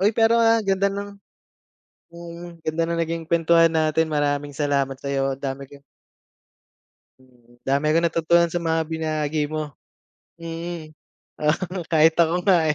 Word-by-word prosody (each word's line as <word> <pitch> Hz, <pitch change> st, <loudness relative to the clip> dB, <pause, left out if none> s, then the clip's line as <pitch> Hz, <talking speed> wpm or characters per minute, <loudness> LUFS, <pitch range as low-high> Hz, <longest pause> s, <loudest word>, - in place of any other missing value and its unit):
Uy, 205 Hz, +3 st, +3 dB
pero, 225 Hz, +1 st, +4 dB
ah, 230 Hz, 0 st, +4 dB
ganda 195 Hz, 0 st, +1 dB
ng 200 Hz, 0 st, -6 dB, 1.0 s
mm, 170 Hz, 0 st, -10 dB
ganda 160 Hz, +1 st, 0 dB
ng 170 Hz, -, -2 dB
naging 165 Hz, 0 st, -3 dB
kwentuhan 165 Hz, 0 st, +4 dB
natin. 160 Hz, 0 st, +1 dB
Maraming 145 Hz, -1 st, -1 dB
salamat 140 Hz, -2 st, 0 dB
sa'yo, 135 Hz, -1 st, -1 dB
ang 135 Hz, -, -23 dB
dami 135 Hz, 0 st, -5 dB
kong 140 Hz, -1 st, -15 dB, 1.4 s
Mm, 120 Hz, -2 st, -25 dB
dami 140 Hz, +2 st, +1 dB
kong 165 Hz, +2 st, +2 dB
natutunan 170 Hz, +1 st, +2 dB
sa 170 Hz, -, -5 dB
mga 165 Hz, 0 st, +1 dB
binahagi 155 Hz, -2 st, -1 dB
mo. 155 Hz, -1 st, -3 dB, 0.7 s
Mm, 165 Hz, -1 st, -7 dB, 0.5 s
oo 175 Hz, +5 st, -1 dB
kahit 160 Hz, 0 st, +5 dB
ako 170 Hz, +2 st, +2 dB
nga, 175 Hz, -5 st, +4 dB
160 Hz, 140 wpm, -23 LUFS, 145-170 Hz, 1.4 s, kahit